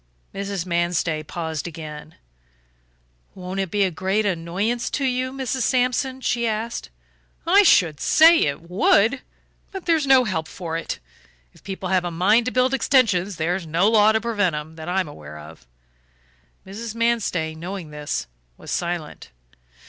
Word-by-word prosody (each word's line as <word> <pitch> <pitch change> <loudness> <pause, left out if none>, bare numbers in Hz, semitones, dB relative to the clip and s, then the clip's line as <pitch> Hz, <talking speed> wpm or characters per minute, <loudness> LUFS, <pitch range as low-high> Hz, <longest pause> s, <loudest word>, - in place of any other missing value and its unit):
Mrs. 195 -2 -4
Manstey 170 -2 0
paused 160 0 -5
again. 155 -1 -9 1.2
"Won't 185 +1 -5
it 190 -2 -1
be 205 +3 +1
a 190 - +1
great 190 +5 0
annoyance 195 +6 -1
to 280 - -1
you, 255 0 -1
Mrs. 265 -1 -3
Sampson?" 255 +1 0
she 235 -2 0
asked. 225 +2 -3 0.6
"I 380 +5 +6
should 170 - +4
say 325 - +6
it 145 +3 -1
would. 200 +7 +3 0.5
But 385 -2 -7
there's 320 -4 +2
no 265 -1 +6
help 160 -8 -2
for 165 -3 -6
it; 165 - -3 0.6
if - - -21
people 190 -1 -5
have 185 -1 +3
got 175 - -4
a - - -4
mind 210 +8 +3
to - - 0
build 255 +1 +2
extensions 205 -9 +2
there's 170 +2 -2
no 165 +5 +2
law 215 -1 +5
to 220 - +2
prevent 205 -7 0
'em, 150 +2 -7
that 160 +1 -7
I'm 185 -2 0
aware 75 - -10
of." 75 -4 -13 1.0
Mrs. 215 +3 -7
Manstey, 230 -9 0
knowing 170 0 -7
this, 150 0 -4 0.3
was - - -9
silent. 170 -3 -4
190 Hz, 155 wpm, -22 LUFS, 165-235 Hz, 1.2 s, I